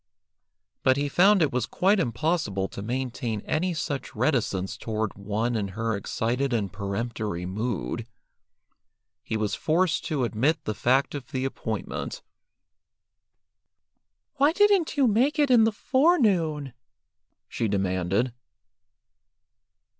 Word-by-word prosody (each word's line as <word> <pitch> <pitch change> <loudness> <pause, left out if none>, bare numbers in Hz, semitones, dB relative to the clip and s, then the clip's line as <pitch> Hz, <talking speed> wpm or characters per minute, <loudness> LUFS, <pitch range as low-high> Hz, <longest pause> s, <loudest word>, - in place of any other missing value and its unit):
But 130 0 +3
he 145 +1 0
found 190 +5 +5
it 150 - 0
was 125 -3 0
quite 195 +3 +2
impossible 120 - 0
to - - -7
maintain 120 -1 -3
any 180 - -1
such 140 -4 -4
reticence 110 -10 0
toward 110 -2 -3
one 105 +4 -2
in 105 -3 -1
her 115 -1 0
excited 120 +6 -1
and 100 -5 -1
peremptory 100 -2 -3
mood. 100 - -3 1.1
He 110 - -3
was 105 -1 -1
forced 160 0 +1
to 145 -5 -1
admit 125 +8 +1
the 110 - -2
fact 130 +6 +2
of 145 -3 -6
the 135 -4 -3
appointment. 135 - -4 2.1
"Why 285 +3 +4
didn't 395 -5 +3
you 275 - +5
make 250 +7 +2
it 290 -3 +3
in 230 -3 +6
the 225 - +2
forenoon?" 200 - +2 0.7
she 115 - -2
demanded. 95 +4 0
125 Hz, 120 wpm, -26 LUFS, 110-175 Hz, 2.1 s, in